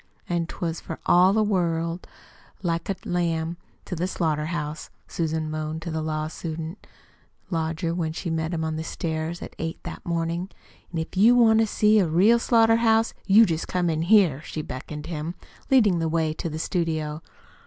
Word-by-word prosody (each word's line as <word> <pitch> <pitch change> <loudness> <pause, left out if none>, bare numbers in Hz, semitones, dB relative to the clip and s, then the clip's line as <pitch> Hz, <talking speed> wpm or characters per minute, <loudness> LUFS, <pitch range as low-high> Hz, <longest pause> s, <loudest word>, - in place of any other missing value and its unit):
"An' 170 -1 -1
'twas 170 -1 -4
for 160 - -6
all 180 +2 +6
the 215 +2 +3
world 170 -4 -1 0.6
like 170 0 -1
a 195 - 0
lamb 170 -1 -1 0.3
to - - -4
the 175 +2 -1
slaughter 155 -4 -1
house," 155 -2 -4 0.2
Susan 160 -1 -2
moaned 155 +1 -4
to 170 - -4
the 160 0 -2
law 155 0 -2
student 160 +2 -6 0.6
lodger 165 +1 -1
when 165 -2 -1
she 165 +1 -4
met 160 0 -1
him 165 -2 -2
on 160 0 -2
the 160 - -3
stairs 160 +1 -3
at - - -9
eight 165 0 -3
o'clock - - -6
that - - -7
morning. 170 +2 -1 0.4
"An' 170 - -4
if 160 +3 -4
you 220 +6 +6
want 225 -2 +5
to 225 - +3
see 215 +1 +4
a 185 - +3
real 195 +9 +4
slaughter 225 -1 +4
house, 225 0 +3
you 215 +3 +7
jest 165 -3 -2
come 180 -2 0
in 160 0 -1
here," 175 -6 +4
she 155 -1 -5
beckoned 150 +4 -7
him, 165 +1 -4 0.3
leading 215 -10 +4
the 165 -1 0
way 160 -1 0
to 165 - -4
the 155 - -5
studio. 160 -2 -2
165 Hz, 190 wpm, -25 LUFS, 160-185 Hz, 0.6 s, you